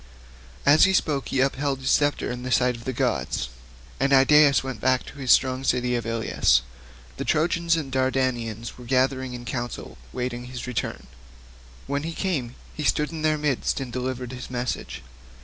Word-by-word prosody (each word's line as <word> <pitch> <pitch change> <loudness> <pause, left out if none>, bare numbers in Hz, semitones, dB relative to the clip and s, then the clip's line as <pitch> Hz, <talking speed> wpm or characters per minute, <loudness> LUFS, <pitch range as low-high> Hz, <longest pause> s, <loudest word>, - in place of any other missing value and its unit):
As 145 +2 +7
he 190 - +2
spoke 145 -7 +1
he 130 - +1
upheld 135 +1 0
his 130 - 0
sceptre 145 -3 +2
in 125 0 -5
the 130 +1 -5
sight 125 0 +3
of 115 - -10
all - - -15
the 130 - -1
gods, 65 - -1 0.5
and 140 +1 +1
Idaeus 140 +1 +6
went 130 -5 -6
back 130 -1 +2
to - - -11
the 135 -2 -7
strong 130 +1 +4
city 125 -1 +1
of 120 -2 -3
Ilius. 110 - +2 0.5
The - - -3
Trojans 165 +1 +2
and 150 -5 -4
Dardanians 130 -4 -1
were 125 - -10
gathered 130 +1 +1
in 125 -1 -7
council 120 -1 -5
waiting 125 -1 -4
his 125 -1 -7
return; 125 -3 -4 0.8
when 140 +1 -2
he 165 +2 -4
came, 145 -11 -2 0.2
he 155 - -5
stood 150 +1 +1
in 160 -1 -6
their 155 0 +2
midst 150 -3 0
and 130 -3 -6
delivered 125 -1 -3
his 125 -1 -7
message. 120 - -4
130 Hz, 185 wpm, -25 LUFS, 125-140 Hz, 0.8 s, As